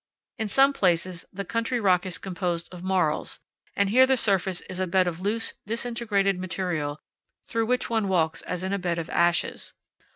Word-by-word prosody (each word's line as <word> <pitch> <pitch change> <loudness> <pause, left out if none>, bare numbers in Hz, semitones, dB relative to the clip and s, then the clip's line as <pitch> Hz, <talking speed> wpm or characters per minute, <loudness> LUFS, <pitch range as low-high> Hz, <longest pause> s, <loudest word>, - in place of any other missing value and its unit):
In 220 - 0
some 270 +6 +5
places 180 -4 0
the 200 +1 -5
country 230 +4 -1
rock 185 -3 +3
is 180 - -3
composed 180 -2 -3
of 175 - -8
marls, 180 -5 0 0.4
and 200 0 +2
here 260 +3 +6
the 265 0 +3
surface 190 -4 +1
is 185 -1 -8
a 185 - 0
bed 185 +1 +3
of 170 -1 -3
loose, 215 +4 0
disintegrated 220 -4 0
material 175 -5 -2 0.5
through 225 -1 -1
which 250 +1 +1
one 225 -3 0
walks 165 -4 +1
as 180 0 -4
in 190 +1 -1
a 200 - 0
bed 175 -2 -1
of 165 - -4
ashes. 170 0 +1
190 Hz, 185 wpm, -26 LUFS, 175-220 Hz, 0.5 s, here